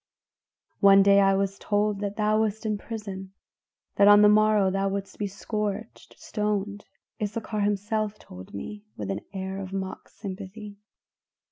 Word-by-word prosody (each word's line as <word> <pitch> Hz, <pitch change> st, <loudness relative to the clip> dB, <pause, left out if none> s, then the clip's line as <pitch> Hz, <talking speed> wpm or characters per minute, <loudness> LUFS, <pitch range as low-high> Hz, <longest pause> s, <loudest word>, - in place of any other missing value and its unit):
"One 195 Hz, 0 st, +7 dB
day 200 Hz, 0 st, +6 dB
I 195 Hz, 0 st, +4 dB
was 195 Hz, 0 st, -1 dB
told 205 Hz, -1 st, 0 dB
that 205 Hz, 0 st, -3 dB
thou 215 Hz, 0 st, +2 dB
wast 220 Hz, 0 st, -2 dB
in 210 Hz, -1 st, -1 dB
prison; 195 Hz, -4 st, -7 dB, 0.6 s
that 200 Hz, -, +6 dB
on 205 Hz, 0 st, +8 dB
the 210 Hz, -, +8 dB
morrow 210 Hz, -2 st, +4 dB
thou 195 Hz, +1 st, 0 dB
wouldst 195 Hz, 0 st, -5 dB
be 205 Hz, -, -1 dB
scourged 210 Hz, +2 st, -5 dB
stoned. 210 Hz, -1 st, -3 dB, 0.4 s
Issachar 215 Hz, +1 st, -3 dB
himself 210 Hz, +1 st, -1 dB
told 90 Hz, +1 st, -12 dB
me, 205 Hz, -, -7 dB
with 100 Hz, -2 st, -3 dB
an 100 Hz, +2 st, -3 dB
air 190 Hz, 0 st, -4 dB
of 190 Hz, -1 st, -7 dB
mock 190 Hz, -1 st, -5 dB
sympathy. 200 Hz, +1 st, -8 dB
205 Hz, 150 wpm, -26 LUFS, 195-210 Hz, 0.6 s, on